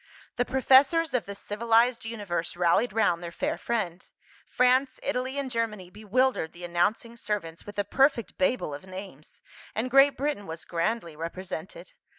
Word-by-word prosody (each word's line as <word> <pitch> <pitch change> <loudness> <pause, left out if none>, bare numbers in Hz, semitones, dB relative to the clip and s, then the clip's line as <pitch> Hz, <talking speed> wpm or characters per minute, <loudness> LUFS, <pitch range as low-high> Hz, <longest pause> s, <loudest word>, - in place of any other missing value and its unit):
The 245 - +2
Professors 270 +5 +4
of 235 -7 0
the 200 - -6
civilised 230 +4 +1
universe 200 -8 -3
rallied 175 +7 +3
round 195 -5 +1
their 170 -1 -6
fair 290 - -2
friend. 190 -7 -3 0.4
France, 260 +1 +2
Italy, 260 0 -2
and 275 -2 -2
Germany 215 -6 -3
bewildered 215 -3 0
the 175 - -12
announcing 175 +7 0
servants 205 -8 -4
with 205 - -9
a 205 - +2
perfect 260 +1 +2
Babel 185 - 0
of 140 - -8
names 185 -6 -10 0.3
and 245 +4 -2
Great 275 +2 +6
Britain 275 -7 -2
was 160 +1 -7
grandly 170 0 -2
represented. 170 - -7
220 Hz, 155 wpm, -27 LUFS, 175-255 Hz, 0.4 s, Great